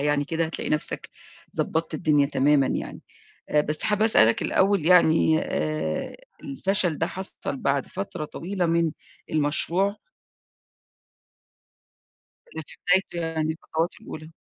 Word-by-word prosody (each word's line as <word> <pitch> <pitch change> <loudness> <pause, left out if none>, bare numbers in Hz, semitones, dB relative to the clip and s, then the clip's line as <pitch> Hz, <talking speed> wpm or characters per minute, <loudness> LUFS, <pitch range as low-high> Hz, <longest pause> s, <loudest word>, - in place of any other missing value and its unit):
يعني 145 0 +1
كده، 165 +3 -1
هتلاقي 160 - -3
نفْسَك 150 - 0 0.5
ضبطت 160 +1 -1
الدنيا 150 -4 +2
تمامًا 140 0 +3
يعني. - - -4 0.5
آآ، 150 - +3
بس 150 +1 -1
حابة 210 0 +1
أسألك 115 - +5
الأول 195 -4 +2
يعني، 160 -3 +5
آآ، 75 +1 -3 0.3
الفشل 175 +3 +1
ده 165 - 0
حصل 190 -6 -6
بعد 140 0 -1
فترة 185 -4 -5
طويلة 180 +4 -3
من 165 -1 +1 0.4
المشروع؟ 165 +6 0 2.5
والّا 480 - -8
في - - -14
بدايته 190 -2 +2
يعني 160 -1 -1
الخطوات 160 +1 -3
الأولى؟ 155 +1 -9
160 Hz, 120 wpm, -25 LUFS, 145-180 Hz, 2.5 s, أسألك